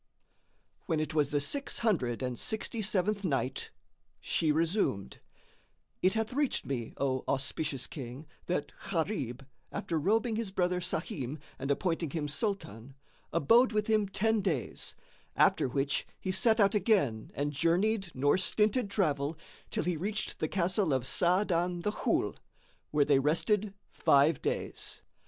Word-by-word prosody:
When 165 -4 +1
it 155 0 -2
was 150 -3 +2
the 145 - +1
Six 275 - -1
Hundred 135 - 0
and 125 -1 -3
Sixty 220 +1 -1
seventh 205 0 +1
Night, 135 -6 -1 0.5
She 160 -2 +1
resumed, 160 - 0 0.8
It 185 +3 +3
hath 220 +1 -1
reached 285 0 +1
me, 120 -5 -4
O 130 -2 0
auspicious 135 0 -1
King, 130 +1 -8 0.2
that 160 -5 -1 0.2
Gharib, 155 - -2 0.3
after 165 - -2
robing 220 +6 +1
his 225 -3 -2
brother 180 -1 0
Sahim 150 -5 -3 0.2
and 135 - -4
appointing 165 +2 0
him 150 0 -2
Sultan, 140 - -3 0.4
abode 230 - +4
with 210 0 +1
him 215 -2 +2
ten 220 +2 +1
days, 160 - -3 0.4
after - - +4
which 140 +2 0
he 190 - -2
set 225 +4 +3
out 200 -2 +5
again 185 - +1
and 145 +1 -1
journeyed 180 +6 +1
nor 145 +7 +3
stinted 210 +3 +2
travel 155 -6 0 0.3
till - - -2
he 175 -2 -1
reached 205 +6 -2
the 155 - 0
castle 185 -1 +1
of 130 -2 -1
Sa'adan 175 +1 +2
the 210 - +1
Ghul, - - 0 0.5
where 145 -1 +3
they 140 -2 +4
rested 195 - +1 0.2
five 140 +2 +3
days. - - -3
170 Hz, 140 wpm, -31 LUFS, 140-205 Hz, 0.8 s, out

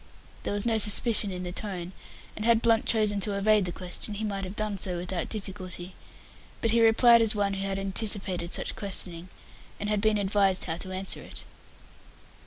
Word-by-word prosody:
There - - -4
was 205 - 0
no 225 -1 +1
suspicion 215 0 +8
in 180 0 -6
the 180 - -5
tone, 180 -2 -5 0.4
and 215 - -6
had 230 0 +2
Blunt 230 -1 +2
chosen 210 -2 +1
to 200 0 -1
evade 210 0 +2
the 175 - -4
question, 185 +4 -6
he 215 - -5
might 200 -2 -4
have 185 +2 -8
done 210 -2 -4
so 180 -1 -1
without 175 -1 -4
difficulty, 185 -3 -7 0.7
but 230 - 0
he 230 0 +2
replied 230 +1 +5
as 220 -1 +1
one 200 -1 -1
who 195 0 -3
had 195 0 -3
anticipated 195 -3 -3
such - - -3
questioning, 185 -3 -6 0.5
and 210 - -4
had 210 -1 -1
been 215 0 +1
advised 195 -1 0
how 165 -1 -4
to 185 +2 -7
answer 190 +1 -4
it. - - -10
200 Hz, 195 wpm, -26 LUFS, 185-215 Hz, 0.7 s, suspicion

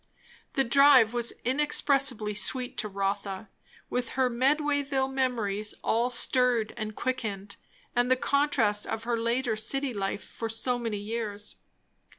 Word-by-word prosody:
The 270 - +3
drive 260 -2 +6
was 240 -1 +1
inexpressibly 270 -4 +1
sweet 250 +4 0
to 215 - -2
Rotha, 195 0 -3 0.4
with 245 -1 -2
her 255 -1 +2
Medwayville 275 +1 +1
memories 215 -6 -1
all 235 +2 +1
stirred 245 -2 +2
and 215 -2 -5
quickened, 205 -6 -3 0.4
and 245 +1 +2
the 255 - +5
contrast 260 -7 +1
of 225 - -3
her 240 0 0
later 235 0 0
city 265 +5 -1
life 200 0 -3
for 225 - -6
so 245 +2 -1
many 225 -3 -3
years. 210 -1 -5
235 Hz, 135 wpm, -28 LUFS, 215-260 Hz, 0.4 s, drive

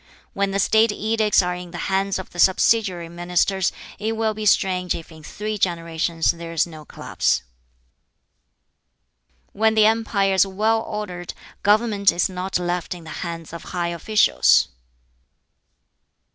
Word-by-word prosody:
When 200 -3 0
the 195 - -2
State 220 +3 +3
edicts 215 -1 +2
are 180 0 -1
in 180 0 -8
the 175 - -8
hands 195 0 0
of 190 - -8
the 175 - -10
subsidiary 190 -2 +3
ministers, 175 +2 0 0.3
it 220 +2 -1
will 220 -1 0
be 215 0 -3
strange 180 -2 +2
if 165 - -9
in 160 -1 -13
three 210 +6 -5
generations 165 -2 0
there 170 0 -8
is 165 - +1
no 155 -3 -12
collapse. 65 - -1 2.1
"When 220 +1 +2
the 215 -1 +5
empire 215 -3 +2
is 190 +1 +4
well 215 +4 +1
ordered, 195 -6 -6 0.3
government 205 -1 +3
is 175 - 0
not 185 0 -2
left 175 0 -3
in 175 - -11
the 155 - -10
hands 165 -2 -6
of 170 - -8
high 170 -1 0
officials. 190 +6 +3
190 Hz, 145 wpm, -22 LUFS, 170-210 Hz, 2.1 s, the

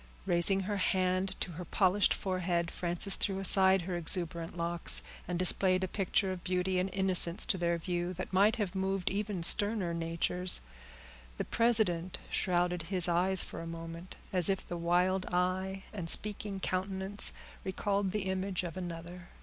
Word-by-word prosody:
Raising 175 +3 +2
her 205 +2 -3
hand 185 0 -1
to 180 - -3
her 175 +2 -8
polished 190 +2 +2
forehead, 180 -2 -2
Frances 175 +2 0
threw 195 0 -1
aside 190 -1 +3
her 180 +1 -4
exuberant 170 0 -2
locks, 170 0 +3 0.2
and 180 0 -3
displayed 185 +1 +3
a - - -1
picture 190 0 -1
of 185 -2 -7
beauty 185 0 -1
and 185 +1 -2
innocence 185 -2 +5
to 190 - -1
their 170 0 0
view 175 +1 -3
that 185 +1 -7
might 205 +4 +3
have 205 -6 -3
moved 190 -1 -2
even 200 -3 -3
sterner 205 -1 +6
natures. 170 +2 -1 0.8
The - - -3
president 210 -7 +1
shrouded 180 -1 -1
his 185 -3 +3
eyes 180 +2 +1
for - - -9
a 165 - -7
moment, 165 +2 -9 0.2
as 180 -2 +4
if 195 -1 -2
the 175 - -5
wild 180 +2 0
eye 185 +2 -2
and 180 -6 -6
speaking 205 0 +1
countenance 190 +2 -3 0.3
recalled 195 +1 -2
the 205 +1 -3
image 190 -1 -3
of 175 -1 -6
another. 175 -1 -8
185 Hz, 160 wpm, -31 LUFS, 175-195 Hz, 0.8 s, sterner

